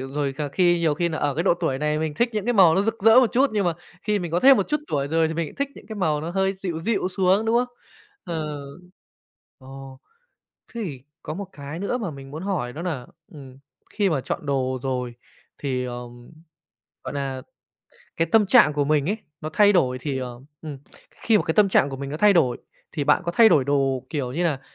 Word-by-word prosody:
rồi 135 Hz, +1 st, -3 dB
cà 145 Hz, +2 st, -4 dB
khi 175 Hz, +4 st, +2 dB
nhiều 165 Hz, -3 st, +1 dB
khi 170 Hz, +3 st, 0 dB
nà 160 Hz, -2 st, -4 dB
ở 145 Hz, -, 0 dB
cái 160 Hz, -, 0 dB
độ 180 Hz, -, +3 dB
tuổi 165 Hz, -6 st, -2 dB
này 150 Hz, +1 st, 0 dB
mình 155 Hz, -1 st, -2 dB
thích 235 Hz, +10 st, +1 dB
những 210 Hz, -2 st, -2 dB
cái 245 Hz, -, +1 dB
màu 180 Hz, -6 st, +6 dB
nó 195 Hz, -, +2 dB
rực 225 Hz, 0 st, -3 dB
rỡ 225 Hz, +4 st, +7 dB
một 250 Hz, -, +1 dB
chút, 265 Hz, +2 st, +3 dB
nhưng 205 Hz, -2 st, 0 dB
mà 175 Hz, -, +2 dB, 0.3 s
khi 210 Hz, -1 st, 0 dB
mình 175 Hz, -3 st, -5 dB
có 175 Hz, -, +1 dB
thêm 270 Hz, +3 st, +7 dB
một 200 Hz, -, -1 dB
chút 300 Hz, -1 st, 0 dB
tuổi 140 Hz, -1 st, -1 dB
rồi 160 Hz, +1 st, +2 dB
thì 160 Hz, -, -4 dB
mình 165 Hz, -2 st, -3 dB
thích 280 Hz, 0 st, -2 dB
những -, -, -14 dB
cái 220 Hz, 0 st, -7 dB
màu 155 Hz, -6 st, 0 dB
nó 160 Hz, +2 st, -4 dB
hơi 190 Hz, +1 st, +1 dB
dịu 185 Hz, -4 st, -4 dB
dịu 195 Hz, +2 st, -1 dB
xuống, 190 Hz, +2 st, +2 dB
đúng 225 Hz, +1 st, +2 dB
không? 245 Hz, 0 st, -1 dB, 0.5 s
Ờ. 155 Hz, -3 st, -4 dB, 1.0 s
Ồ, 135 Hz, 0 st, -11 dB, 0.8 s
thế 235 Hz, -, -4 dB
thì 140 Hz, -9 st, -6 dB, 0.2 s
có 155 Hz, -, -5 dB
một 200 Hz, +3 st, -6 dB
cái 145 Hz, +2 st, -8 dB
nữa 200 Hz, +6 st, -2 dB
mà 205 Hz, -8 st, -3 dB
mình 135 Hz, -2 st, -11 dB
muốn 155 Hz, +4 st, -7 dB
hỏi 180 Hz, -11 st, -2 dB
đó 155 Hz, -, -7 dB
nà, 150 Hz, -9 st, -4 dB, 0.3 s
ừm, 135 Hz, -3 st, -12 dB, 0.3 s
khi 200 Hz, -3 st, +1 dB
mà 150 Hz, -5 st, 0 dB
chọn 145 Hz, -, -5 dB
đồ 130 Hz, -2 st, -1 dB
rồi 125 Hz, -3 st, -3 dB, 0.4 s
thì, 130 Hz, -3 st, -2 dB
ờm 120 Hz, -1 st, -8 dB, 0.7 s
gọi -, -, -5 dB
là, 135 Hz, -2 st, -3 dB, 0.7 s
cái 165 Hz, -, +1 dB
tâm 220 Hz, -2 st, +5 dB
trạng 210 Hz, -, +6 dB
của 145 Hz, -1 st, 0 dB
mình 150 Hz, 0 st, +1 dB
ấy, 210 Hz, -, -1 dB, 0.2 s
nó 155 Hz, -, -5 dB
thay 205 Hz, +2 st, +5 dB
đổi 130 Hz, -9 st, +2 dB
thì, 135 Hz, 0 st, -3 dB
ờ 125 Hz, -2 st, -6 dB, 0.2 s
ừm, 150 Hz, -4 st, -7 dB, 0.3 s
khi 225 Hz, -2 st, +1 dB
mà -, -, -2 dB
cái 160 Hz, -, 0 dB
tâm 210 Hz, -2 st, +5 dB
trạng 145 Hz, -6 st, +3 dB
của 135 Hz, -, -5 dB
mình 140 Hz, +1 st, -6 dB
nó 150 Hz, -, -4 dB
thay 205 Hz, +5 st, +5 dB
đổi, 130 Hz, -10 st, +2 dB, 0.4 s
thì 150 Hz, -4 st, -2 dB
bạn -, -, +3 dB
có 170 Hz, -, -2 dB
thay 225 Hz, +4 st, +7 dB
đổi 150 Hz, -9 st, +4 dB
đồ 135 Hz, -2 st, 0 dB
kiểu 135 Hz, -6 st, -3 dB
như 170 Hz, +6 st, -1 dB
là, 150 Hz, -6 st, 0 dB
160 Hz, 240 wpm, -23 LUFS, 135-195 Hz, 1.0 s, rỡ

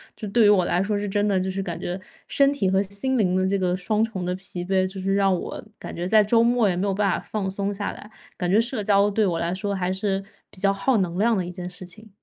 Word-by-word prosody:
这 215 Hz, -, -6 dB
对 230 Hz, +3 st, +4 dB
于 -, -, +6 dB
我 190 Hz, -4 st, +4 dB
来 175 Hz, -, +1 dB
说 205 Hz, +1 st, 0 dB
是 205 Hz, 0 st, -2 dB
真 205 Hz, +1 st, 0 dB
的， 195 Hz, -2 st, +2 dB
就 190 Hz, +1 st, -2 dB
是 195 Hz, +1 st, -3 dB
感 175 Hz, -3 st, -5 dB
觉 180 Hz, +2 st, -4 dB, 0.3 s
身 280 Hz, 0 st, +3 dB
体 280 Hz, -9 st, 0 dB
和 190 Hz, +1 st, +3 dB
心 200 Hz, +7 st, -2 dB
灵 190 Hz, -7 st, +2 dB
的 185 Hz, 0 st, +2 dB
这 200 Hz, +1 st, +1 dB
个 180 Hz, -1 st, +1 dB
双 210 Hz, +4 st, 0 dB
重 195 Hz, -5 st, -3 dB
的 180 Hz, -, -1 dB
疲 180 Hz, -1 st, -5 dB
惫， 185 Hz, 0 st, +1 dB
就 190 Hz, +1 st, -7 dB
是 195 Hz, +1 st, 0 dB
让 195 Hz, -1 st, +3 dB
我 -, -, -6 dB
感 -, -, -8 dB
觉 175 Hz, +1 st, -3 dB
在 215 Hz, +2 st, +5 dB
周 230 Hz, +3 st, +3 dB
末 235 Hz, -2 st, +3 dB
也 185 Hz, -, +1 dB
没 190 Hz, +3 st, -1 dB
有 195 Hz, -, +1 dB
办 200 Hz, -1 st, +2 dB
法 -, -, 0 dB
放 195 Hz, -3 st, -3 dB
松 200 Hz, +1 st, -2 dB
下 205 Hz, 0 st, -3 dB
来， 210 Hz, -, -11 dB, 0.3 s
感 180 Hz, -3 st, -2 dB
觉 200 Hz, +4 st, +4 dB
社 230 Hz, -1 st, -1 dB
交 200 Hz, 0 st, +4 dB
对 215 Hz, +2 st, +1 dB
我 170 Hz, -2 st, 0 dB
来 170 Hz, +1 st, -1 dB
说 200 Hz, +2 st, -2 dB
还 185 Hz, -1 st, -1 dB
是 195 Hz, 0 st, -1 dB, 0.3 s
比 -, -, -10 dB
较 195 Hz, 0 st, +3 dB
耗 225 Hz, +5 st, +1 dB
能 180 Hz, -2 st, -1 dB
量 225 Hz, 0 st, +3 dB
的 185 Hz, -, -1 dB
一 175 Hz, -, -6 dB
件 180 Hz, 0 st, -6 dB
事 180 Hz, +1 st, -8 dB
情。 215 Hz, +5 st, -11 dB
195 Hz, 315 characters per minute, -24 LUFS, 185-210 Hz, 0.3 s, 于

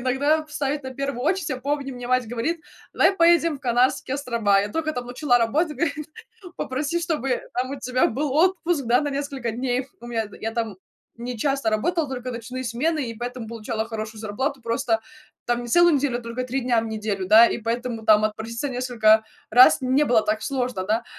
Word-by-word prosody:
иногда 285 Hz, +5 st, +1 dB
в 305 Hz, -, -16 dB
ставить 285 Hz, 0 st, -2 dB
на 260 Hz, 0 st, -6 dB
первую 275 Hz, -2 st, -3 dB
очередь. 345 Hz, +1 st, 0 dB
Я 260 Hz, -, -2 dB
помню, 280 Hz, 0 st, -2 dB
мне 245 Hz, -1 st, -7 dB
мать 255 Hz, -2 st, +1 dB
говорит: 305 Hz, +8 st, -2 dB, 0.3 s
"Давай -, -, +4 dB
поедем 335 Hz, -2 st, +4 dB
в -, -, -31 dB
Канарские 250 Hz, +2 st, +1 dB
острова". 230 Hz, -8 st, +1 dB
Я 205 Hz, -, -2 dB
только 310 Hz, +4 st, -2 dB
там 245 Hz, -3 st, -5 dB
начала 245 Hz, 0 st, +2 dB
работать, 300 Hz, +8 st, +1 dB
говорит: 305 Hz, -3 st, -2 dB, 0.5 s
"Попроси 290 Hz, +6 st, -2 dB
чтобы 300 Hz, -7 st, -1 dB
там 255 Hz, +1 st, -1 dB
у 275 Hz, -, -6 dB
тебя 255 Hz, +1 st, +2 dB
был 270 Hz, +4 st, -2 dB
отпуск 340 Hz, -2 st, +2 dB
да, 245 Hz, +3 st, +4 dB
на 295 Hz, -, -2 dB
несколько 275 Hz, -4 st, -3 dB
дней". 245 Hz, +2 st, -1 dB
Их 265 Hz, -, -9 dB
у 240 Hz, -, -10 dB
меня 225 Hz, -2 st, -2 dB
я 225 Hz, +1 st, -3 dB
там 225 Hz, -4 st, -3 dB, 0.4 s
не 240 Hz, +1 st, -5 dB
часто 275 Hz, 0 st, 0 dB
работала, 300 Hz, +8 st, 0 dB
только 255 Hz, -1 st, -5 dB
ночные 250 Hz, +3 st, -6 dB
смены 260 Hz, +3 st, -1 dB
и 230 Hz, -, -7 dB
поэтому 240 Hz, 0 st, -6 dB
получала 220 Hz, -1 st, -3 dB
хорошую 220 Hz, -1 st, -6 dB
зарплату, 260 Hz, +6 st, -3 dB
просто 230 Hz, -1 st, 0 dB, 0.4 s
там 240 Hz, 0 st, 0 dB
не 240 Hz, -, -7 dB
целую 345 Hz, +4 st, +5 dB
неделю, 255 Hz, -3 st, -1 dB
только 235 Hz, +2 st, -4 dB
3 255 Hz, +2 st, -2 dB
дня 240 Hz, -2 st, +2 dB
в 225 Hz, -, -5 dB
неделю, 210 Hz, -3 st, -3 dB
да, 225 Hz, +3 st, +8 dB
и -, -, -2 dB
поэтому 230 Hz, 0 st, -3 dB
там 215 Hz, 0 st, +6 dB
отпроситься 225 Hz, +5 st, -3 dB
несколько 230 Hz, -4 st, +3 dB, 0.3 s
раз 250 Hz, +3 st, +7 dB
не 260 Hz, +4 st, +3 dB
было 235 Hz, -5 st, +3 dB
так 215 Hz, 0 st, -1 dB
сложно, 250 Hz, -8 st, -2 dB
да, 225 Hz, +3 st, 0 dB
250 Hz, 200 wpm, -24 LUFS, 230-285 Hz, 0.5 s, да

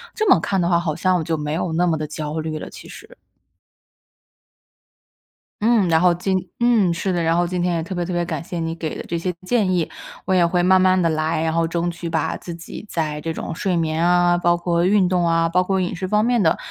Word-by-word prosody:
这 435 Hz, -3 st, 0 dB
么 -, -, +6 dB
看 195 Hz, -2 st, -1 dB
的 170 Hz, -, +1 dB
话 170 Hz, -1 st, +3 dB
好 165 Hz, -3 st, -2 dB
像 185 Hz, +1 st, +1 dB
我 165 Hz, -, -2 dB
就 160 Hz, 0 st, -1 dB
没 150 Hz, -1 st, -4 dB
有 165 Hz, 0 st, -2 dB
那 175 Hz, +2 st, +2 dB
么 165 Hz, -2 st, +1 dB
的 155 Hz, -, -4 dB
焦 150 Hz, +1 st, -4 dB
虑 155 Hz, 0 st, -3 dB
了 -, -, -7 dB
其 -, -, -12 dB
实。 465 Hz, +3 st, -13 dB, 2.5 s
嗯， 220 Hz, -4 st, +3 dB
然 160 Hz, -1 st, +3 dB
后 180 Hz, -1 st, +5 dB
今 190 Hz, +2 st, -1 dB, 0.2 s
嗯， 230 Hz, -7 st, +3 dB
是 185 Hz, +2 st, -2 dB
的， 175 Hz, -1 st, 0 dB
然 165 Hz, +1 st, +2 dB
后 175 Hz, 0 st, +2 dB
今 180 Hz, 0 st, -2 dB
天 175 Hz, -1 st, 0 dB
也 165 Hz, -, -2 dB
特 185 Hz, +3 st, -6 dB
别 175 Hz, -, -1 dB
特 180 Hz, -, -5 dB
别 175 Hz, 0 st, -1 dB
感 160 Hz, -2 st, -4 dB
谢 170 Hz, 0 st, -5 dB
你 165 Hz, 0 st, -3 dB
给 160 Hz, -2 st, -5 dB
的 -, -, -6 dB
这 170 Hz, -, -2 dB
些 180 Hz, +2 st, -2 dB
建 215 Hz, -6 st, +2 dB
议， 175 Hz, -3 st, 0 dB, 0.4 s
我 190 Hz, -, 0 dB
也 175 Hz, -, +4 dB
会 175 Hz, +1 st, +1 dB
慢 185 Hz, +1 st, +4 dB
慢 185 Hz, 0 st, +3 dB
地 170 Hz, -, +2 dB
来， 155 Hz, 0 st, -1 dB
然 160 Hz, 0 st, 0 dB
后 165 Hz, 0 st, +1 dB
争 170 Hz, +1 st, -1 dB
取 170 Hz, 0 st, -6 dB
把 160 Hz, -1 st, -1 dB
自 175 Hz, -, -8 dB
己 170 Hz, +5 st, -9 dB
在 150 Hz, -2 st, -2 dB
这 165 Hz, -, -3 dB
种 160 Hz, -, -5 dB
睡 185 Hz, 0 st, -1 dB
眠 160 Hz, 0 st, 0 dB
啊， 175 Hz, 0 st, +3 dB
包 175 Hz, 0 st, +2 dB
括 170 Hz, 0 st, 0 dB
运 195 Hz, -1 st, +3 dB
动 180 Hz, -1 st, +1 dB
啊， 165 Hz, 0 st, +2 dB
包 180 Hz, +2 st, +2 dB
括 190 Hz, +1 st, 0 dB
饮 180 Hz, 0 st, -2 dB
食 185 Hz, +2 st, -4 dB
方 210 Hz, +2 st, +2 dB
面 240 Hz, -1 st, +2 dB
的， 160 Hz, -, +3 dB
175 Hz, 275 characters per minute, -21 LUFS, 165-185 Hz, 2.5 s, 么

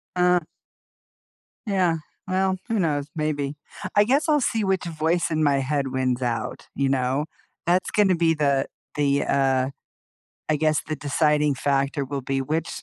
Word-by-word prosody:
Uh 180 Hz, 0 st, +4 dB, 1.3 s
Yeah. 185 Hz, -5 st, +2 dB, 0.3 s
Well, 190 Hz, 0 st, +1 dB
who 225 Hz, -3 st, 0 dB
knows? 145 Hz, -5 st, 0 dB
Maybe. 150 Hz, -2 st, -1 dB, 0.4 s
I 205 Hz, -, +7 dB
guess 275 Hz, +7 st, +2 dB
I'll 300 Hz, -2 st, +3 dB
see 225 Hz, -3 st, 0 dB
which 190 Hz, -2 st, 0 dB
voice 165 Hz, +1 st, 0 dB
in 155 Hz, 0 st, +1 dB
my 140 Hz, -1 st, +3 dB
head 140 Hz, 0 st, -1 dB
wins 130 Hz, -1 st, 0 dB
out, 115 Hz, -2 st, -3 dB
you 140 Hz, -1 st, +1 dB
know? 135 Hz, +2 st, +1 dB, 0.4 s
That's 180 Hz, +2 st, +2 dB
gonna 200 Hz, -3 st, +4 dB
be 165 Hz, -1 st, +3 dB
the 140 Hz, -3 st, +1 dB, 0.3 s
the, 140 Hz, -1 st, +2 dB
uh 135 Hz, -1 st, +2 dB, 0.8 s
I 155 Hz, -, +2 dB
guess, 155 Hz, 0 st, +2 dB
the 155 Hz, -, -2 dB
deciding 150 Hz, +1 st, +2 dB
factor 140 Hz, +1 st, 0 dB
will 140 Hz, +1 st, -4 dB
be 135 Hz, +1 st, -2 dB
which, 155 Hz, +5 st, -2 dB
150 Hz, 155 wpm, -24 LUFS, 140-175 Hz, 1.3 s, I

